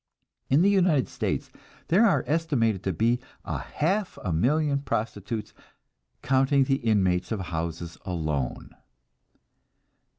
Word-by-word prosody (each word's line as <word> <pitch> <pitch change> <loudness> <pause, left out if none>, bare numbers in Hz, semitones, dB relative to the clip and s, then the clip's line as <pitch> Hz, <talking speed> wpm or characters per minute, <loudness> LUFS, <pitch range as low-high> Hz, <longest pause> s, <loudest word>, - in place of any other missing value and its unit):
In 140 +6 +4
the 200 - +5
United 180 -8 +3
States - - -3 0.4
there 200 +8 +5
are 195 - +2
estimated 135 - +1
to 95 - +1
be 115 +8 +1 0.3
a - - -3
half 190 +6 -1
a 90 - -1
million 140 - +2
prostitutes, 110 -4 -3 0.7
counting 135 +1 +3
the 135 0 +1
inmates 95 -7 +1
of 110 - -1
houses 85 -1 -4
alone. 80 -8 -3
115 Hz, 120 wpm, -26 LUFS, 90-150 Hz, 0.7 s, the